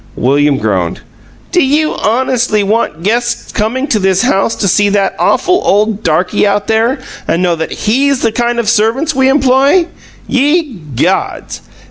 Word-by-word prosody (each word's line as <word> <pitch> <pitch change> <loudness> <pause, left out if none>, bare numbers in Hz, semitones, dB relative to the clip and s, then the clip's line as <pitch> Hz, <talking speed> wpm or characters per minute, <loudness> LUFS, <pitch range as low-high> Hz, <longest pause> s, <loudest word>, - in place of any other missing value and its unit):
William 140 +2 +1
groaned. 95 -7 -2 0.5
"Do 355 - +2
you 300 +3 +1
honestly 235 -2 0
want 200 -6 -1
guests 235 +3 -1
coming 235 +5 -1
to 220 - +1
this 190 +1 +1
house 225 -3 +1
to 200 - -1
see 205 +2 +2
that 200 -1 0
awful 365 +1 +1
old 210 +1 +1
darky 180 +4 +1
out 200 0 0
there 225 +5 +1 0.3
and 170 - 0
know 175 -2 +1
that 160 0 -5
HE'S 270 +5 0
the 230 - +2
kind 240 +1 -1
of 235 -2 -1
servants 235 +8 +1
we 265 0 +2
employ? 275 +5 +3 0.4
Ye 290 +2 +1 0.2
gods!" - - -2
225 Hz, 155 wpm, -12 LUFS, 195-265 Hz, 0.5 s, employ